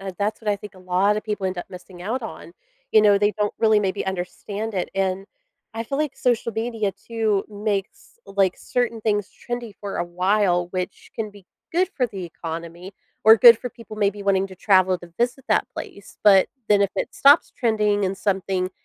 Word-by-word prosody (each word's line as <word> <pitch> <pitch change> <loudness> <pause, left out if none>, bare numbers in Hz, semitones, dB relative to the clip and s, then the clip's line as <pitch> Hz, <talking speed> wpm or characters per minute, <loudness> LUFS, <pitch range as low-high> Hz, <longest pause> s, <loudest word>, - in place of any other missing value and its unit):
uh, 195 0 -5
that's 210 +1 -1
what 215 -2 -1
I 205 - +1
think 205 0 -11
a - - -15
lotta 190 +4 +1
people 210 -3 -3
end 185 -1 -3
up - - -5
missing 180 -1 -11
out 230 +6 -2
on, 225 - -8 0.4
you 215 - +6
know, 205 -1 +5
they 205 +1 +2
don't 205 -1 0
really 220 -2 +4
maybe 195 -1 -1
understand 200 +3 -4
it. 180 - -2
And 195 0 -1 0.5
I 230 +1 -3
feel 275 +4 -3
like 295 -3 -1
social 245 -3 +1
media 225 -2 -1
too 220 -4 -1
makes, 205 - -4
like, 195 -2 +1
certain 240 -2 -2
things 210 -2 0
trendy 240 -3 -6
for 200 -1 -5
a - - 0
while, 180 0 +1
which 185 +1 -5
can 215 -2 -4
be 200 -2 -17 0.3
good 360 +2 +2
for 255 - +2
the 195 -4 -6
economy- 170 +3 -7 0.3
or 220 +1 +8
good 235 +1 +9
for 250 - -5
people 230 -3 -12
maybe 205 -1 0
wanting 195 -1 +2
to 185 - -12
travel 185 -2 +3
to 175 -1 -14
visit 245 +2 -1
that - - +1
place- 200 - -9
but 195 -2 +6 0.2
then 205 -1 +5
if 200 - +1
it - - -3
stops 285 +3 +5
trending 210 -4 +1
and 190 +1 -2
something 190 -2 -1
205 Hz, 200 wpm, -23 LUFS, 190-220 Hz, 0.5 s, good